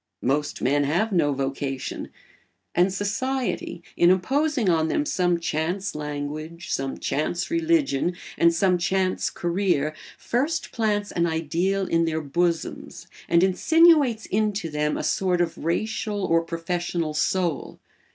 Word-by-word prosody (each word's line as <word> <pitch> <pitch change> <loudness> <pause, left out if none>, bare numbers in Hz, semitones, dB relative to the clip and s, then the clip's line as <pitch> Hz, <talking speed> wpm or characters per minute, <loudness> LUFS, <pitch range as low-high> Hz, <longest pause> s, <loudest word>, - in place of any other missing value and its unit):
Most 145 +4 -1
men 145 +3 +2
have 175 +10 +1
no 160 -6 +2
vocation; 135 -1 -3 0.6
and 180 +2 +3
society, 215 0 -2
in 175 - +5
imposing 265 - +1
on 160 -3 +3
them 295 - 0
some 175 -9 +1
chance 170 +4 -2
language, 150 +3 -5
some 135 0 -2
chance 175 - -2
religion, 320 - +1 0.2
and 170 0 +4
some 180 +1 +2
chance 185 +1 0
career, 175 -4 0 0.2
first 290 +7 -1
plants 210 -3 0
an 170 0 +1
ideal 170 +5 0
in 165 -2 +2
their 160 -1 -1
bosoms 165 +3 -2 0.2
and 170 +1 +4
insinuates 285 - +4
into 205 -5 -1
them 150 0 0
a - - -3
sort 185 -2 +1
of 170 -2 0
racial 205 +4 -1
or 165 -1 +3
professional 165 -1 -3
soul. 170 +1 -1
175 Hz, 130 wpm, -24 LUFS, 160-205 Hz, 0.6 s, in